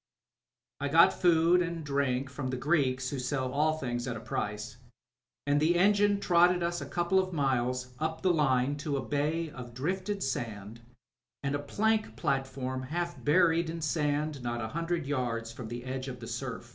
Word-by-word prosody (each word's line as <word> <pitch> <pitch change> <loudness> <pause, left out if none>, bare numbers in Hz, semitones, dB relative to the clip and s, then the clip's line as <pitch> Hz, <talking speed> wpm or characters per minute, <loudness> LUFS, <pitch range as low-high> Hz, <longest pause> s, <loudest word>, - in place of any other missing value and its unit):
I 145 - -1
got 165 +4 +6
food 175 0 +4
and 170 -2 -3
drink 140 -2 0
from 140 -1 -4
the 130 0 -2
Greeks 130 -3 +1
who 140 - -3
sell 130 0 -1
all 155 +2 +2
things 120 -4 -3
at 120 -2 -3
a - - -6
price, 105 +1 -4 0.7
and 145 0 +3
the 160 +3 +3
engine 205 +2 +4
trotted 175 -1 +4
us 170 0 -1
a - - -5
couple 175 +2 +1
of 185 -1 -1
miles 125 -3 0
up 160 +1 -2
the 185 -2 +4
line 140 -2 +2
to 145 -2 -2
a 130 - -4
bay 150 +3 -1
of 120 -3 -9
drifted 190 +8 -2
sand 115 -4 -4 0.6
and 140 0 -1
a 145 - 0
plank 215 +9 0
platform 135 -3 -2
half 170 +6 -4
buried 165 +1 +3
in 165 +1 -4
sand 150 -2 -1
not 120 0 -2
a 110 -1 -3
hundred 165 +1 -2
yards 120 -5 -2
from 115 0 -8
the 120 +2 -6
edge 130 +1 -4
of 125 -2 -6
the 115 - -8
siu^. - - -5
145 Hz, 185 wpm, -30 LUFS, 130-170 Hz, 0.7 s, got